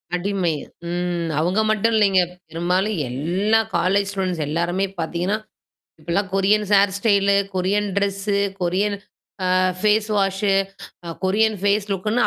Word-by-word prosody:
அடிமை. 180 Hz, -2 st, -1 dB, 0.4 s
ம். 175 Hz, -1 st, -2 dB
அவுங்க 180 Hz, +6 st, +1 dB
மட்டும் 220 Hz, +2 st, +1 dB
இல்லேங்க. 195 Hz, -3 st, +4 dB, 0.3 s
பெரும்பாலும் 180 Hz, +5 st, 0 dB
எல்லா 180 Hz, -, +1 dB, 0.2 s
காலேஜ் 195 Hz, +3 st, +1 dB
ஸ்டூடண்ட்ஸ் 185 Hz, -5 st, -2 dB
எல்லாருமே 175 Hz, +5 st, 0 dB
பாத்தீங்கன்னா, 175 Hz, +5 st, -1 dB, 0.6 s
இப்பெல்லாம் 175 Hz, +5 st, -1 dB
கொரியன்ஸ்ஹேர் 200 Hz, 0 st, +3 dB
ஸ்டைலு, 200 Hz, -2 st, +3 dB, 0.2 s
கொரியன் 200 Hz, +3 st, 0 dB
ட்ரெஸ்ஸு, 200 Hz, 0 st, 0 dB, 0.2 s
கொரியன் 195 Hz, +4 st, 0 dB, 0.6 s
அ -, -, +4 dB, 0.2 s
ஃபேஸ் 215 Hz, +1 st, +2 dB
வாஷு, 195 Hz, 0 st, +1 dB, 0.5 s
அ 165 Hz, -, -5 dB
கொரியன் 215 Hz, +3 st, +2 dB
ஃபேஸ் 205 Hz, 0 st, +1 dB
லுக்குன்னு 210 Hz, +5 st, +1 dB
195 Hz, 115 wpm, -21 LUFS, 180-205 Hz, 0.6 s, இல்லேங்க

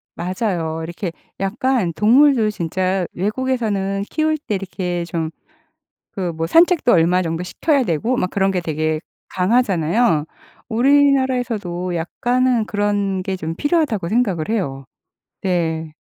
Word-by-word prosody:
맞아요. 175 Hz, -3 st, -2 dB
이렇게 170 Hz, +2 st, -4 dB, 0.3 s
약간 225 Hz, 0 st, 0 dB
동물도 235 Hz, -, +4 dB
진짜 185 Hz, +1 st, -1 dB
외국에서는 205 Hz, -2 st, -1 dB
키울 310 Hz, 0 st, 0 dB
때 220 Hz, -8 st, -3 dB
이렇게 180 Hz, -2 st, -3 dB
좀 165 Hz, -1 st, -3 dB, 0.8 s
그 180 Hz, -3 st, -3 dB
뭐 165 Hz, 0 st, -3 dB
산책도 335 Hz, -, +4 dB
얼마 180 Hz, +2 st, +4 dB
정도 165 Hz, +1 st, -3 dB
시켜야 280 Hz, -, +1 dB
되고 220 Hz, +7 st, 0 dB
막 180 Hz, -, 0 dB
그런 195 Hz, -1 st, +1 dB
게 185 Hz, -2 st, 0 dB
되게 155 Hz, -1 st, -1 dB, 0.4 s
강하잖아요. 190 Hz, -4 st, +2 dB, 0.4 s
우리나라에서도 245 Hz, -8 st, +2 dB
약간은 240 Hz, +7 st, 0 dB
그런 205 Hz, -2 st, 0 dB
게 190 Hz, 0 st, -3 dB
좀 165 Hz, -2 st, -4 dB
필요하다고 290 Hz, -, 0 dB
생각을 200 Hz, -8 st, 0 dB
해요. 140 Hz, -12 st, -2 dB, 0.6 s
네. 160 Hz, -4 st, -1 dB
195 Hz, 280 characters per minute, -20 LUFS, 170-240 Hz, 0.8 s, 동물도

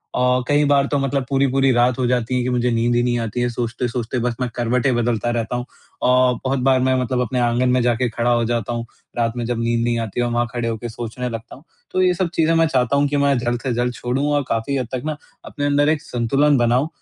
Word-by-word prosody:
अ, 125 Hz, 0 st, +2 dB
कई 145 Hz, 0 st, +3 dB
बार 140 Hz, -1 st, +3 dB
तो 145 Hz, -, 0 dB
मतलब 135 Hz, -1 st, -1 dB
पूरी-पूरी 135 Hz, 0 st, +2 dB
रात 120 Hz, +1 st, +2 dB
हो 125 Hz, -, +1 dB
जाती 125 Hz, 0 st, 0 dB
है -, -, +1 dB
कि 125 Hz, -, -1 dB
मुझे 125 Hz, 0 st, +1 dB
नींद 120 Hz, +1 st, +1 dB
ही 120 Hz, -, +3 dB
नहीं 120 Hz, -1 st, +1 dB
आती 115 Hz, +1 st, -3 dB
है, 120 Hz, -, +1 dB
सोचते-सोचते 120 Hz, +1 st, -3 dB
बस 120 Hz, -1 st, -1 dB
मैं 125 Hz, -, 0 dB
करवटें 125 Hz, +2 st, +1 dB
बदलता 120 Hz, -1 st, 0 dB
रहता 115 Hz, +1 st, -2 dB
हूँ। 125 Hz, 0 st, -3 dB
अ, -, -, -7 dB, 0.4 s
बहुत 135 Hz, +1 st, 0 dB
बार 130 Hz, 0 st, +3 dB
मैं 130 Hz, 0 st, +2 dB
मतलब 125 Hz, 0 st, -1 dB
अपने 125 Hz, +1 st, -1 dB
आँगन 120 Hz, +1 st, +1 dB
में 125 Hz, 0 st, +3 dB
जाके 120 Hz, +1 st, +1 dB
खड़ा 120 Hz, +2 st, -1 dB
हो 120 Hz, -1 st, +2 dB
जाता 120 Hz, 0 st, -2 dB
हूँ। 115 Hz, 0 st, -3 dB, 0.3 s
रात 115 Hz, -1 st, +1 dB
में 120 Hz, -, -2 dB
जब 120 Hz, 0 st, -2 dB
नींद 115 Hz, 0 st, 0 dB
नहीं 120 Hz, 0 st, 0 dB
आती 115 Hz, +1 st, -3 dB
है, 120 Hz, -, +1 dB
वहाँ 120 Hz, 0 st, 0 dB
खड़े 120 Hz, -1 st, -2 dB
होके 115 Hz, +1 st, -4 dB
सोचने 120 Hz, +2 st, -5 dB
लगता 115 Hz, 0 st, -7 dB
हूँ। 140 Hz, -, -17 dB, 0.3 s
तो 185 Hz, -, +1 dB
ये 180 Hz, -1 st, +4 dB
सब 180 Hz, -1 st, -1 dB
चीज़ें 165 Hz, 0 st, +3 dB
मैं 165 Hz, 0 st, +4 dB
चाहता 130 Hz, -2 st, +1 dB
हूँ 145 Hz, 0 st, +3 dB
कि 145 Hz, 0 st, -1 dB
मैं 140 Hz, -1 st, +2 dB
जल्द 120 Hz, 0 st, -2 dB
से 130 Hz, -, -2 dB
जल्द 120 Hz, +1 st, -1 dB
छोडूँ 125 Hz, +4 st, -2 dB
और 145 Hz, -, +1 dB
काफ़ी 115 Hz, +5 st, -1 dB
हद 125 Hz, -, -2 dB
तक 125 Hz, -, -2 dB
ना, 155 Hz, -1 st, -3 dB, 0.3 s
अपने 145 Hz, -, -4 dB
अंदर 145 Hz, +1 st, +3 dB
एक 155 Hz, -2 st, +1 dB
संतुलन 135 Hz, +5 st, +1 dB
बनाऊँ, 120 Hz, +4 st, +2 dB
125 Hz, 255 wpm, -20 LUFS, 120-135 Hz, 0.4 s, ये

